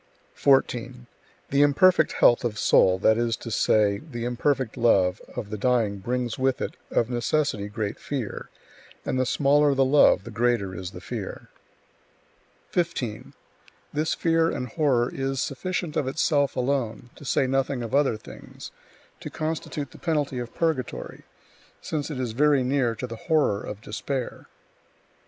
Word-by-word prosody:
14. 125 -2 +1 0.5
The 140 +1 +3
imperfect 180 +6 +4
health 120 - +4
[of 115 -3 -2
soul], 95 -3 +4
that 110 +4 +3
is 115 -1 0
to 115 - -8
say, 105 -2 +2
the 120 -7 -6
imperfect 125 0 0
love, 100 -6 +3
of 105 - -5
the 105 - -4
dying 115 -4 +1
brings 120 +3 -2
with 130 0 +1
it, - - -4
of 115 - +1
necessity, 120 -3 0
great 105 0 -4
fear; 130 -7 -5 0.6
and 130 - -1
the 130 - +1
smaller 145 +1 +3
the 135 0 +3
love, 145 +2 +5
the 115 - -9
greater 115 -4 0
is 90 0 -6
the - - -10
fear. - - -6 1.2
15. 140 -11 -2 0.6
This 155 +2 0
fear 165 0 +2
and 125 -5 -4
horror 125 -3 +1
is 135 0 -2
sufficient 170 +3 -3
of 135 - 0
itself 145 0 +1
alone 125 -3 -2
(to - - -13
say 135 0 +1
nothing 135 -1 0
of 115 - -6
other 140 -5 +3
things) - - -11 0.5
to - - -7
constitute 155 -3 -4
the - - -14
penalty 145 -6 -1
of 120 -1 -6
purgatory, 160 -7 -2 0.6
since 150 -1 -3
it 145 -4 -5
is 125 -3 -2
very 140 +2 +3
near 125 -3 +1
to 120 - -5
the 115 -2 -7
horror 150 -11 +2
of 105 0 -7
despair. 125 +5 -5
125 Hz, 155 wpm, -25 LUFS, 115-145 Hz, 1.2 s, love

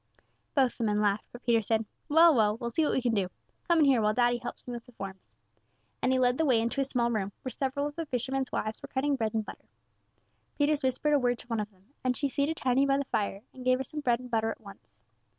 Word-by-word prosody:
Both 265 -4 +2
the - - 0
men 210 -1 +1
laughed, 205 0 +1
but 245 - -11
Peters 230 -3 +2
said, 225 -1 +1 0.2
"Well, 325 +2 +7
well, 215 -4 +3
we'll 235 0 -4
see 320 - +1
what 300 - +1
we 260 - 0
can 240 -2 +1
do; 195 -4 0 0.4
come 340 - +4
in 310 - +5
here 265 -5 +4
while 210 0 +2
daddy 240 -1 +3
helps 240 - -7
me 245 - -5
with 235 -1 -6
the - - -15
forms;" 195 -3 -9 0.7
and 255 - +2
he 260 - +3
led 250 +1 +2
the 320 - +3
way 250 -5 +4
into 235 +5 0
a - - +3
small 245 -3 0
room, 205 -3 -1
where 255 - -4
several 275 +2 -1
of 290 0 -4
the 330 -2 -4
fishermen's 260 +1 -2
wives 215 +1 -3
were - - -8
cutting 280 +2 0
bread 225 -3 -2
and 220 -1 0
butter. - - -11 0.9
Peters 290 0 +2
whispered 260 +3 +1
a 290 - +5
word 245 -1 +1
to - - -13
one 230 -2 -1
of 210 0 -3
them, 195 +5 -29
and 255 -1 0
she 280 - 0
seated 285 +5 0
Tiny 265 +2 +2
by 275 0 +3
the 280 - -1
fire, 200 -4 -2
and 255 - -10
gave 255 0 +3
her 265 - -3
some 300 +4 -5
bread 240 -5 +1
and 250 -1 -10
butter 225 -1 +1
at 225 - -6
once. 200 - -14
245 Hz, 270 wpm, -29 LUFS, 225-275 Hz, 0.9 s, Well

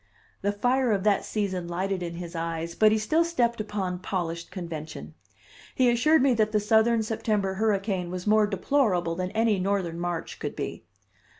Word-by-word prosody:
The 200 - +1
fire 245 +4 +1
of 195 -2 -1
that 205 -2 +2
season 190 -5 -2
lighted 185 +2 -2
in 170 -1 -4
his 170 0 -7
eyes, 165 0 -3
but 215 +4 +4
he 220 - +3
still 310 +10 +2
stepped 240 -9 0
upon 195 -4 -3
polished 170 -3 -3
convention. 165 -4 -7 0.6
He 250 -2 +4
assured 305 +5 +4
me 270 -2 +4
that 215 -2 +1
the 215 - +2
Southern 220 +2 +3
September 215 -3 -1
hurricane 195 -3 0
was 180 0 -5
more 215 0 +4
deplorable 195 -4 +1
than 180 +2 -3
any 220 -2 +2
Northern 185 -3 -1
March 175 -1 -4
could - - -4
be. - - -5
200 Hz, 175 wpm, -26 LUFS, 175-220 Hz, 0.6 s, but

